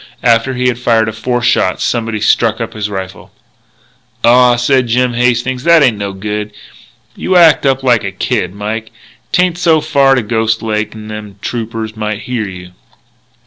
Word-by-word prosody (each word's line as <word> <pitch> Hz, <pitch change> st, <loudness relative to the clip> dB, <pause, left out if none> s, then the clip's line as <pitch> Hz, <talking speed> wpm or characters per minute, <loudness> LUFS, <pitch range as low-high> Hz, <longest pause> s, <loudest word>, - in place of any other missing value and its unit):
After 120 Hz, +2 st, +2 dB
he 125 Hz, 0 st, 0 dB
had 120 Hz, -1 st, -1 dB
fired 115 Hz, -2 st, +2 dB
a 110 Hz, -, -3 dB
fourth 120 Hz, +2 st, -2 dB
shot, 95 Hz, -2 st, +1 dB
somebody 115 Hz, -2 st, -2 dB
struck 115 Hz, +1 st, +2 dB
up 115 Hz, -, -4 dB
his 105 Hz, -1 st, -4 dB
rifle. 95 Hz, -1 st, -7 dB, 0.9 s
"Aw," 125 Hz, +1 st, +5 dB
said 125 Hz, +1 st, +1 dB
Jim 125 Hz, +1 st, +1 dB
Hastings, 125 Hz, +1 st, 0 dB
"that 170 Hz, -2 st, +5 dB
ain't 115 Hz, -6 st, +2 dB
no 100 Hz, -1 st, -3 dB
good. 105 Hz, +2 st, -5 dB, 0.6 s
You 185 Hz, -, -1 dB
act 165 Hz, -5 st, +5 dB
up 135 Hz, 0 st, 0 dB
like 120 Hz, -3 st, +2 dB
a 100 Hz, -, -3 dB
kid, -, -, -2 dB
Mike. 110 Hz, +2 st, -4 dB, 0.4 s
'Tain't 180 Hz, -1 st, +1 dB
so 165 Hz, -3 st, +3 dB
far 140 Hz, -2 st, +3 dB
to 125 Hz, -, 0 dB
Ghost 110 Hz, +1 st, -1 dB
Lake, 110 Hz, -1 st, -2 dB
n'them 105 Hz, -1 st, -8 dB
Troopers 115 Hz, -2 st, -4 dB
might 105 Hz, -1 st, -4 dB
hear 120 Hz, -4 st, -3 dB
you." 90 Hz, -1 st, -10 dB
115 Hz, 170 wpm, -13 LUFS, 105-125 Hz, 0.9 s, Aw